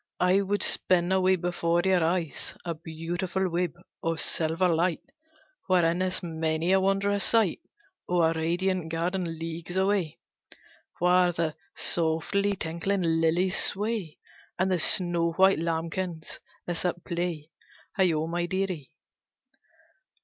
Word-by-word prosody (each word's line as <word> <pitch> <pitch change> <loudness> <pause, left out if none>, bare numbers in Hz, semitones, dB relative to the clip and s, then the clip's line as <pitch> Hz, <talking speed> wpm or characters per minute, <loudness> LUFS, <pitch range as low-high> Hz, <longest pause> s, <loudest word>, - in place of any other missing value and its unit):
I 180 +2 +4
would 200 +1 0
spin 175 0 +2
a 190 0 +3
web 185 -1 +3
before 175 -1 0
your 185 -3 +3
eyes, 165 -2 -2
A 170 - -1
beautiful 170 +4 -3
web 175 0 0 0.3
of 165 0 -1
silver 165 +3 +1
light, 170 0 +1 0.6
Wherein 175 -2 +3
is 185 0 -1
many 160 0 -1
a 190 - +5
wondrous 195 +1 +1
sight 225 -6 +2 0.5
Of 180 0 +2
a 160 0 +3
radiant 175 +1 0
garden 170 0 -2
leagues 165 +2 -5
away, 190 -4 +1 0.8
Where 180 0 +4
the 165 -2 -1 0.2
softly 175 +5 0
tinkling 180 +3 -2
lilies 165 +3 +2
sway, 205 -5 -2 0.4
And 190 +1 +1
the 180 - +2
snow 170 -1 +2
white 190 0 +4
lambkins 165 0 -3 0.3
are 175 - -1
at 175 -1 -2
play, 170 -3 -3 0.4
Heigho, 165 -5 +2
my 175 +1 -2
dearie!" 185 -8 -2
175 Hz, 130 wpm, -27 LUFS, 165-185 Hz, 0.8 s, a